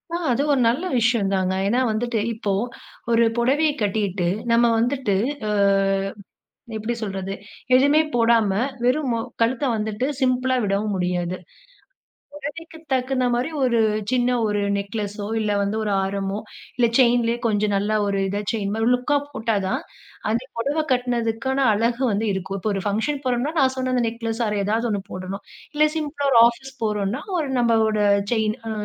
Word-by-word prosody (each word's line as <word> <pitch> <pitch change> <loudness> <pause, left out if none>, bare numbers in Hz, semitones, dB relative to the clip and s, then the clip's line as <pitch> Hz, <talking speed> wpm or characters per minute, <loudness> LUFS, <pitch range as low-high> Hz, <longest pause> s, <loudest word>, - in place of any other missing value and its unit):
ஆ. - - +1
அது 245 - +1
ஒரு 270 - +2
நல்ல 260 +9 -1 0.2
விஷயம் 225 -4 +2
தாங்க. 185 0 0
ஏனா, 240 +5 +2
வந்துட்டு 230 +1 -1
இப்போ 210 -2 -3 0.6
ஒரு 230 0 +5
புடவைய 280 +6 +3
கட்டிட்டு 195 -4 0 0.2
நம்ம 235 +1 +5
வந்துட்டு 245 -3 0 0.3
அ - - -1 1.3
எப்டி 220 +2 -2
சொல்றது. 195 -1 -4 0.4
எதுவுமே 285 +4 +5
போடாம 230 -3 +3 0.3
வெறும் 260 +3 +2
ம - - +1 0.3
கழுத்த 240 +4 +1
வந்துட்டு 220 +2 -2
சிம்பிளா 255 -1 +1
விடவும் 205 +1 0
முடியாது. 180 -1 -1 1.0
புடவைக்கு 320 +3 -8
தகுந்த 255 0 +1
மாரி 245 +6 -1
ஒரு 235 -2 +2 0.3
சின்ன 250 -1 +2 0.2
ஒரு 210 -1 0 0.2
நெக்லஸோ, 205 0 -4
இல்ல 210 -1 -1
வந்து 200 +2 -1
ஒரு 210 -1 -1
ஆரமோ, 195 +1 -2 0.4
இல்ல 245 - +4
செயின்லேயே 240 -2 +3
கொஞ்சம் 210 -2 +1
நல்லா 205 +2 +1
ஒரு 200 -1 0
இத 200 +2 -2
செயின் 205 -3 -2
மாரி 225 +1 0
லுக்கா 250 +4 +1
போட்டா 225 -5 -1
தான், 260 +8 -1 0.5
அந்த 230 +2 0
புடவை 285 +7 0
கட்டினதுக்கான 245 +1 -1 0.2
அழகு 235 +4 0
வந்து 210 +3 0
இருக்கும். 190 +1 -4
இப்போ 215 - -1
ஒரு 195 - -2
ஃபங்ஷன் 225 +8 -1
போறோம்னா 250 +4 0
நான் 260 -1 +3
சொன்ன 255 0 -1
அந்த 245 -1 +2
நெக்லஸ் 225 0 -3
ஆர் 210 -1 -1
எதாவது 225 +4 0
ஒண்ணு 200 -2 -1
போடணும். 185 +2 -6 0.3
இல்ல 300 +1 +4
சிம்பிளா 290 -2 -2
ஒரு 235 - +7
ஆஃபீஸ் 265 +3 -8
போறோம்னா, 210 +4 -1 0.2
ஒரு 295 -4 -2
நம்மளோட 225 -2 +2 0.3
செயின். 220 -1 +1
அ - - -3
230 Hz, 155 wpm, -23 LUFS, 205-255 Hz, 1.3 s, ஒரு